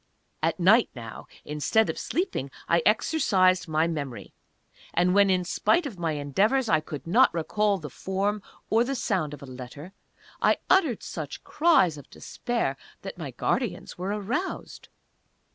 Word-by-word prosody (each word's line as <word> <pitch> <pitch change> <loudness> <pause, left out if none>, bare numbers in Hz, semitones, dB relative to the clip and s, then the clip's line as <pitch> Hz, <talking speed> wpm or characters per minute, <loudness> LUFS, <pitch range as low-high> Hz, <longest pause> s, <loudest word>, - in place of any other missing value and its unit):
At - - 0
night 215 +7 +5
now, 115 -3 -9 0.2
instead 150 +9 +1
of - - -3
sleeping, 335 - -2 0.2
I 170 - +3
exercised 190 - +3
my 155 0 +2
memory; 145 -7 -5 0.6
and 180 +1 +3
when 200 0 +5
in 185 -1 +2
spite 340 - +2
of 225 -11 -6
my 165 -2 0
endeavors 200 - +1
I 215 - +4
could 150 -3 -8
not 220 +10 +5
recall 205 +5 +1
the 150 -6 -8
form 200 +5 -2 0.3
or 225 +2 +4
the 270 +3 -2
sound 185 - -1
of 145 -2 -9
a - - -7
letter, 130 +7 -10 0.5
I - - +4
uttered 320 - +3
such - - -6
cries 245 - +3
of 140 - -15
despair 230 - -3 0.3
that - - -7
my - - -5
guardians - - -2
were 185 +2 -3
aroused. 210 - -4
185 Hz, 155 wpm, -26 LUFS, 155-220 Hz, 0.6 s, night